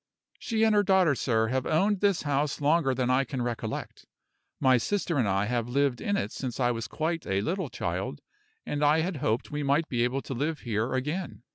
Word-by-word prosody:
"She 225 Hz, -1 st, 0 dB
and 220 Hz, -1 st, +4 dB
her 205 Hz, -, +5 dB
daughter, 190 Hz, -5 st, +4 dB
sir, 110 Hz, -4 st, +1 dB
have 130 Hz, +1 st, -1 dB
owned 195 Hz, +6 st, +2 dB
this 200 Hz, -3 st, +2 dB
house 145 Hz, 0 st, 0 dB
longer 145 Hz, -2 st, +2 dB
than 125 Hz, 0 st, 0 dB
I 130 Hz, +2 st, +3 dB
can 135 Hz, -3 st, -4 dB
recollect. 115 Hz, -2 st, -5 dB, 0.5 s
My 130 Hz, -1 st, +5 dB
sister 170 Hz, -, -1 dB
and 115 Hz, -, +2 dB
I 100 Hz, +1 st, +1 dB
have 120 Hz, +1 st, -1 dB
lived 135 Hz, -1 st, +1 dB
in 205 Hz, 0 st, 0 dB
it -, -, -2 dB
since 130 Hz, -2 st, -5 dB
I 120 Hz, -1 st, +3 dB
was 115 Hz, -1 st, -4 dB
quite 165 Hz, +6 st, -2 dB
a 95 Hz, 0 st, +1 dB
little 185 Hz, -, -2 dB
child, -, -, -3 dB, 0.5 s
and 145 Hz, 0 st, -2 dB
I 150 Hz, +2 st, +4 dB
had 175 Hz, 0 st, -2 dB
hoped 115 Hz, -3 st, -1 dB
we 150 Hz, 0 st, -2 dB
might 145 Hz, +3 st, +1 dB
be 120 Hz, -2 st, +1 dB
able 130 Hz, +3 st, -1 dB
to -, -, -5 dB
live 150 Hz, +4 st, -2 dB
here 115 Hz, +1 st, -1 dB
again. 150 Hz, +3 st, -3 dB
140 Hz, 215 wpm, -28 LUFS, 120-165 Hz, 0.5 s, her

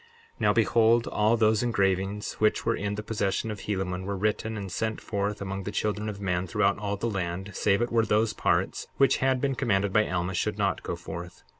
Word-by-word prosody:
63:12 -, -, -15 dB
Now -, -, +4 dB
behold, 115 Hz, 0 st, +4 dB
all 110 Hz, +2 st, +2 dB
those 110 Hz, -1 st, +3 dB
engravings 100 Hz, -3 st, 0 dB
which 110 Hz, 0 st, +2 dB
were 115 Hz, -, +2 dB
in 105 Hz, 0 st, -2 dB
the 105 Hz, -, -5 dB
possession 105 Hz, 0 st, -1 dB
of 105 Hz, -, -6 dB
Helaman 95 Hz, -2 st, -3 dB
were 100 Hz, 0 st, -3 dB
written 110 Hz, +2 st, -1 dB
and 100 Hz, -3 st, -5 dB
sent 110 Hz, +4 st, -2 dB
forth 100 Hz, -1 st, -2 dB
among 95 Hz, 0 st, -4 dB
the 100 Hz, -, -5 dB
children 105 Hz, 0 st, -1 dB
of 100 Hz, -2 st, -6 dB
men 90 Hz, -2 st, -1 dB
throughout 100 Hz, +3 st, +1 dB
all 100 Hz, -1 st, -2 dB
the 115 Hz, -, -2 dB
land, 95 Hz, -2 st, -3 dB
save 100 Hz, +5 st, +2 dB
it 120 Hz, -, -3 dB
were 115 Hz, -1 st, +3 dB
those 110 Hz, 0 st, +2 dB
parts -, -, 0 dB
which 135 Hz, -, +4 dB
had 130 Hz, -1 st, +2 dB
been 135 Hz, +1 st, 0 dB
commanded 100 Hz, -7 st, 0 dB
by 105 Hz, 0 st, +3 dB
Alma 90 Hz, +1 st, -1 dB
should 85 Hz, -, -1 dB
not -, -, 0 dB
go -, -, -4 dB
forth. 85 Hz, -1 st, -8 dB
105 Hz, 215 wpm, -27 LUFS, 95-110 Hz, -, Now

